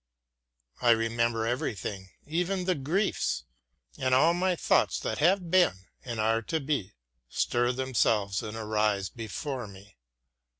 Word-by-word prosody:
I 120 - +3
remember 115 0 +2
everything, 105 -5 -3 0.2
even 180 +4 -1
the 185 - +2
griefs, 170 +8 -1 0.6
and 130 -1 +2
all 160 +6 +5
my 180 +1 +1
thoughts - - +2
that - - -3
have 175 +2 +2
been 175 - +3 0.2
and 120 -3 -5
are 115 +1 +2
to 160 +8 -2
be 135 -9 -2 0.4
bestir 120 - +1
themselves 115 -6 +1
and 110 -1 -6
arise 105 -3 0
before 120 +2 -5
me. 100 -2 -15
120 Hz, 130 wpm, -28 LUFS, 110-155 Hz, 0.6 s, all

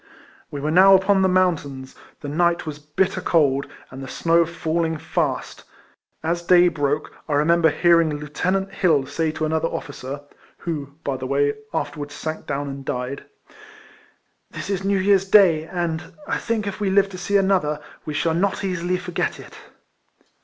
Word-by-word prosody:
We 145 - -6
were 150 +2 -1
now 190 +3 +7
upon 190 +1 +3
the 190 - +3
mountains; 145 -8 0 0.3
the 145 - -6
night 170 +4 +1
was 150 -2 -6
bitter 185 +6 -1
cold, 140 -6 +2 0.2
and 130 +1 -8
the 135 - -7
snow 165 +4 +2
falling 165 -1 -1
fast. 155 -3 -2 0.6
As 170 +2 -1
day 175 0 +5
broke, 145 -1 -2 0.2
I - - 0
remember 160 +3 +4
hearing 165 -1 +3
Lieutenant 185 +6 -2
Hill 155 -7 +2
say 160 +3 -1
to 155 0 -2
another 160 +1 0
officer 140 -2 -6 0.4
(who, 145 -4 -5
by 140 -2 -2
the 130 0 -5
way, 145 +1 +2 0.2
afterwards 145 -1 -4
sank 155 0 -5
down, 140 0 -2
and 135 0 -6
died), 125 +1 -4 0.6
" - - -31
This - - -4
is 195 -2 -1
Xew 195 -1 +1
Year's 195 -1 +4
Day; 175 -7 +5
and, 170 -2 -3 0.2
I - - -1
think 225 -3 -2
if 200 0 -5
we 205 -2 0
live 195 0 +3
to 185 -2 -8
see 200 +3 +1
another, 185 -7 +1 0.2
we 150 - -5
shall 165 +1 +1
not 195 +4 0
easily 180 -1 -1
forget 180 -1 -3
it." - - -12
165 Hz, 170 wpm, -22 LUFS, 145-185 Hz, 0.6 s, now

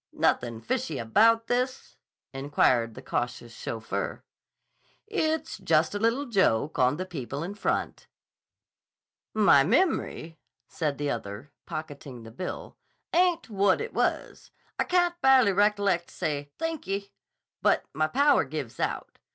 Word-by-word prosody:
"Nuthin' 115 -2 0
fishy 255 - -2
about 225 - +4
this?" 250 +2 -2 0.4
inquired 130 -4 +1
the - - -10
cautious 120 -1 -3
chauffeur. 115 -1 -4 0.8
"It's 320 -7 -1
just - - +2
a 205 - -2
little 230 +6 +1
joke 185 - +1
on 130 +3 +3
the 185 - -3
people 145 -4 -5
in 185 +4 -5
front." 205 - -2 1.3
"My 200 -10 +6
mem'ry," 170 - 0 0.3
said 150 -4 -2
the 145 -1 -1
other, 115 +4 -6 0.2
pocketing 145 -6 -7
the 115 - -11
bill, 180 +10 -6 0.4
"ain't 350 -1 +3
whut 200 -3 +2
it 465 - -5
was. - - -2 0.3
I - - +2
c'n 355 -1 +3
t 345 - -27
ba'ly 260 -6 +5
rec'lect 200 -3 +2
t' - - -17
say 145 -1 -3
'Thank 325 - -3
ye,' 200 +1 -3 0.5
but - - +3
there - - -38
my 155 0 +1
power 285 - +4
gives 140 -4 -6
out. - - -3
185 Hz, 140 wpm, -27 LUFS, -, 1.3 s, My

